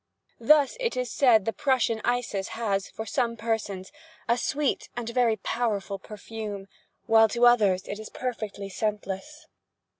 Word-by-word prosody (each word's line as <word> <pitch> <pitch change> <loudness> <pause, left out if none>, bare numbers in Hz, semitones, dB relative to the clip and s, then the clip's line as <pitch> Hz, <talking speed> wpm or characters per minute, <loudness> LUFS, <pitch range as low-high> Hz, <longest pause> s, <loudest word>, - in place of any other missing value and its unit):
Thus 290 - +4
it 470 - -1
is 250 -3 -2
said 230 -7 +4
the 225 - -1
Prussian 240 -2 +1
Isis 240 -5 -1
has, 200 -4 -1
for 220 - -6
some 230 +1 -1
persons, 210 -4 -3 0.4
a 235 - +4
sweet 280 +3 -1
and 240 -2 -3
very 235 -1 +2
powerful 205 -2 -2
perfume, 210 -1 -7 0.4
while 225 0 +6
to 235 +3 +3
others 205 -6 +4
it 205 +1 -6
is 215 - -8
perfectly 215 -5 -5
scentless. 210 +9 -4
225 Hz, 145 wpm, -27 LUFS, 205-245 Hz, 0.4 s, while